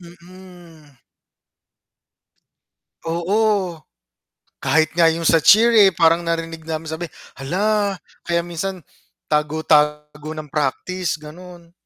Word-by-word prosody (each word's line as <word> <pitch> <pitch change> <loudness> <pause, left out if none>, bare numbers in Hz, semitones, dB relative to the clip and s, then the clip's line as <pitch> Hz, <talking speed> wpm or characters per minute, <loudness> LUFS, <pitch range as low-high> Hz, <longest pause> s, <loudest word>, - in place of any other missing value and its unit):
Mm. 175 -4 -16 2.1
Oo. 185 0 0 0.8
Kahit 160 -1 +1
nga 170 -1 +4
yung 165 +1 -2
sa 165 0 +4
cheer, 225 +8 +6
eh, 205 -4 +6
parang 165 0 +3
narinig 165 -1 -4
namin 160 0 -4
sabi, 160 +1 -5 0.3
hala 200 +6 0 0.3
kaya 170 0 0
minsan 175 +1 -5 0.5
tago 150 +1 -1
tago 150 0 0
ng 150 -2 -8
practice 165 +5 -2
ganon. 170 +2 -13
170 Hz, 100 wpm, -20 LUFS, 155-185 Hz, 2.1 s, cheer